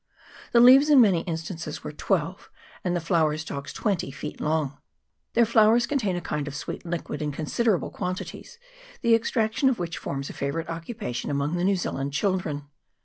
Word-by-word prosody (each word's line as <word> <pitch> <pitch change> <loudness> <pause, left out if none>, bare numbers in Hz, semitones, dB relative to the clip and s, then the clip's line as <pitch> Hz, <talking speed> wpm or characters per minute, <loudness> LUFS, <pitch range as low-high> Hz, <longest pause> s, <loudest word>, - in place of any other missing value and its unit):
The 235 - +5
leaves 265 +5 +8
in 290 -3 +7
many 195 -8 +5
instances 165 -2 -5
were - - -5
twelve, 170 +3 -2 0.3
and 180 -1 0
the - - +1
flower 160 -2 +1
stalks 140 -3 -6
twenty, 200 -9 -1
feet 145 +2 -7
long; 150 -2 -1 0.5
their 235 0 +5
flowers 225 +1 +5
contain 215 -11 0
a 175 - -3
kind 150 -3 -3
of 145 - -6
sweet - - -5
liquid 170 -3 -4
in 150 -1 -1
considerable 175 - 0
quantities, 185 - -5 0.5
the 235 -1 +4
ex 225 0 +2
traction 225 +4 +2
of 255 - 0
which 170 -3 -4
forms 140 0 -4
a - - -7
favourite 140 +4 -3
occupation 165 - -5
among 145 +3 -1
the 175 - -1
New 195 +1 +3
Zealand 140 -6 -3
children. 155 -4 -1
170 Hz, 180 wpm, -26 LUFS, 150-220 Hz, 0.5 s, leaves